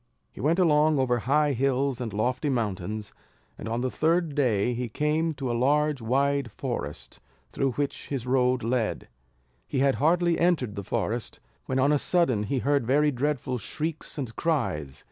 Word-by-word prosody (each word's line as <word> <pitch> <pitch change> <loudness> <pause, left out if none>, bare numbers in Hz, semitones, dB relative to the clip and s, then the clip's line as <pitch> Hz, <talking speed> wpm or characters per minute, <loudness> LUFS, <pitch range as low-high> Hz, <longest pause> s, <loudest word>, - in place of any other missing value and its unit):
He - - -10
went 155 +6 +2
along 155 -4 +4
over 125 -2 +1
high 145 +4 +2
hills 135 0 0
and 115 -3 -3
lofty 125 - -1
mountains, 105 -4 -3 0.4
and 110 - -7
on 115 +1 -1
the 130 0 -1
third 165 0 +1
day 125 -5 +1
he 120 0 -3
came 155 +5 0
to 130 -3 -3
a - - 0
large 145 +3 +2
wide 140 +3 +1
forest, - - -5 0.3
through 135 -2 0
which 140 +3 -3
his 135 -4 -3
road 125 -1 +2
led. 115 -1 -1 0.6
He 140 - -3
had 135 0 +3
hardly 170 +2 +3
entered 165 -11 +2
the 100 -1 -5
forest, 115 +3 -3 0.3
when 130 - -1
on 135 +2 +3
a 150 - +3
sudden 165 - +2
he 135 +6 -1
heard 140 -1 +1
very 150 +3 +3
dreadful 130 -2 -1
shrieks 155 +9 -4
and 125 -6 -4
cries. 95 - -1
135 Hz, 170 wpm, -27 LUFS, 120-150 Hz, 0.6 s, along